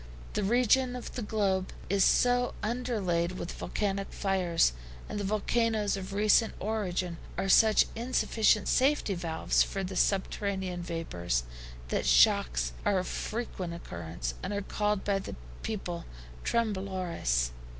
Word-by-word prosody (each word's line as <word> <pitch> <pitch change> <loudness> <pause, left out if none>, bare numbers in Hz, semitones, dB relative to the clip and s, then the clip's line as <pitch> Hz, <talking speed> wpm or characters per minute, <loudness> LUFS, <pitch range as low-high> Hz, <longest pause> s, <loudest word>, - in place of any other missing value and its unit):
This 210 - 0
region 245 +4 +3
of 250 - -7
the 245 - -4
globe 200 -3 0 0.2
is 195 0 +3
so 245 +3 +3
underlaid 210 -7 -1
with 175 -1 -5
volcanic 195 -1 -2
fires 180 - +2 0.3
and 205 - -4
the - - -2
volcanoes 215 +1 +1
of 190 -1 -6
recent 215 +3 +3
origin 185 -5 -2 0.2
are 195 - -1
such 215 +3 +6
insufficient 225 -3 +2
safety 265 -5 +2
valves 170 -3 0
for 195 - 0
the 190 0 -5
subterranean 190 -2 0
vapors, 90 - -2 0.5
that - - -1
shocks - - +4
are 200 - +2
of 185 - -1
frequent 190 -7 -4
occurrence, 80 - -5
and 205 - -3
are 200 0 -2
called 210 0 -1
by 200 -1 +1
the - - -7 0.3
people 180 -6 -4 0.4
TREMBLORES. 185 - 0
195 Hz, 130 wpm, -30 LUFS, 175-215 Hz, 0.5 s, such